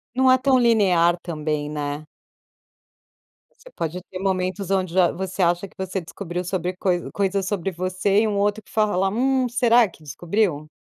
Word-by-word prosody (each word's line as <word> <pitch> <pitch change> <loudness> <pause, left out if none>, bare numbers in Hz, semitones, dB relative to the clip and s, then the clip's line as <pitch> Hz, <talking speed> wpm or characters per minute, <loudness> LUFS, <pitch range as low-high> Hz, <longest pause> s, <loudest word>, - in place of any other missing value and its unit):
Não 260 0 +4
é 260 - +6
tão 260 0 +3
linear 190 -8 +4
também, 150 -3 -3
né. 145 0 -4 1.5
Você - - -16
pode 170 +2 -4
ter 185 0 -9
momentos 190 0 -2
onde 185 -3 0
já 185 -2 +4
você 190 +2 -4
acha 175 +2 +1
que - - -25
você 190 0 -3
descobriu 175 +1 -6
sobre 180 0 -2
coi 180 -2 -1
coisas 195 -1 -1
sobre 195 -2 -2
você 185 +3 0
e 225 - +1
um 205 -2 -1
outro 205 +1 0
que - - -21
fala: 200 -3 +1
"Hum, 260 +3 +1
será 240 -2 +4
que 160 - -19
descobriu?". 160 0 -1
190 Hz, 170 wpm, -23 LUFS, 175-210 Hz, 1.5 s, é